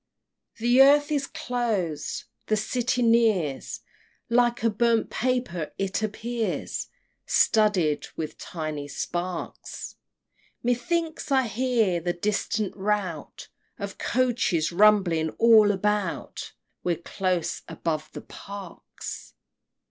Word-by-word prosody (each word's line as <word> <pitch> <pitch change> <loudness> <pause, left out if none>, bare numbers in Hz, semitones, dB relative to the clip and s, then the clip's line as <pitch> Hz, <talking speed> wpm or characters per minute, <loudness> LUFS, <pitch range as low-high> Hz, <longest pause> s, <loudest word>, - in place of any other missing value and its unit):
The 240 +3 +5
earth 290 +2 +6
is 280 -2 0
close! 210 -11 -2 0.2
the 215 - +2
City 245 +3 0
nears 220 - +2 0.5
Like 240 0 +2
a 230 - +3
burnt 230 +1 +2
paper 245 -10 -1
it 195 +2 -1
appears, 225 +2 -2 0.4
Studded 200 -9 +3
with 155 -2 -4
tiny 155 -3 -5
sparks! 175 +4 -5 0.7
Methinks 305 +6 -1
I 265 -1 +4
hear 225 -5 +1
the 175 +1 -1
distant 205 +2 -1
rout 195 -6 -3 0.3
Of 200 -1 -6
coaches 240 -11 +1
rumbling 180 -4 +4
all 225 -2 +7
about 205 0 -2 0.3
We're 175 -1 +1
close 180 +1 -2
above 155 -1 -3
the - - -6
Parks! 200 -3 -9
210 Hz, 100 wpm, -26 LUFS, 175-240 Hz, 0.7 s, all